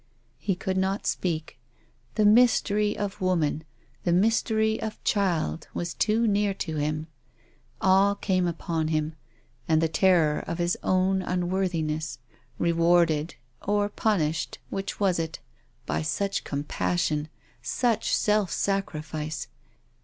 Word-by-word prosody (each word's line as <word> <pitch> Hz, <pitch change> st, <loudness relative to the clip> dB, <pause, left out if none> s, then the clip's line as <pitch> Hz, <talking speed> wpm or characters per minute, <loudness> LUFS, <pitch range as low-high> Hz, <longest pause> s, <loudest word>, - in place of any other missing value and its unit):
He 195 Hz, -, 0 dB
could 190 Hz, +1 st, -2 dB
not 190 Hz, +2 st, 0 dB
speak. 160 Hz, -7 st, -2 dB, 0.6 s
The 215 Hz, -, +3 dB
mystery 210 Hz, -2 st, +4 dB
of 205 Hz, 0 st, -4 dB
woman, 165 Hz, -4 st, +1 dB, 0.4 s
the 175 Hz, -, +1 dB
mystery 220 Hz, +3 st, +2 dB
of 220 Hz, -1 st, -5 dB
child 175 Hz, -5 st, 0 dB
was 170 Hz, -1 st, -3 dB
too 225 Hz, +2 st, +2 dB
near 205 Hz, -2 st, +2 dB
to 160 Hz, -5 st, -4 dB
him. 155 Hz, +1 st, -1 dB, 0.8 s
Awe 195 Hz, +2 st, +4 dB
came 185 Hz, -3 st, 0 dB
upon 165 Hz, -1 st, -2 dB
him 155 Hz, 0 st, -1 dB, 0.5 s
and 160 Hz, -1 st, +4 dB
the 165 Hz, -, +2 dB
terror 165 Hz, -3 st, +3 dB
of 170 Hz, -, -3 dB
his 175 Hz, 0 st, +1 dB
own 185 Hz, +1 st, +2 dB
unworthi 180 Hz, -1 st, -1 dB
ness, 155 Hz, -4 st, -3 dB, 0.4 s
rewarded 170 Hz, -2 st, +2 dB, 0.2 s
— 120 Hz, -, -39 dB
or 205 Hz, 0 st, +2 dB
punished 165 Hz, -8 st, 0 dB
— -, -, -35 dB
which 195 Hz, +1 st, -4 dB
was 190 Hz, -4 st, +2 dB
it? 160 Hz, -2 st, -3 dB, 0.3 s
— 125 Hz, -, -38 dB
by -, -, 0 dB
such 195 Hz, +5 st, -1 dB
compassion, 150 Hz, +1 st, -1 dB, 0.3 s
such 230 Hz, -, +1 dB
self 210 Hz, -3 st, +2 dB
sacrifice. 155 Hz, -5 st, -2 dB
180 Hz, 130 wpm, -26 LUFS, 160-200 Hz, 0.8 s, mystery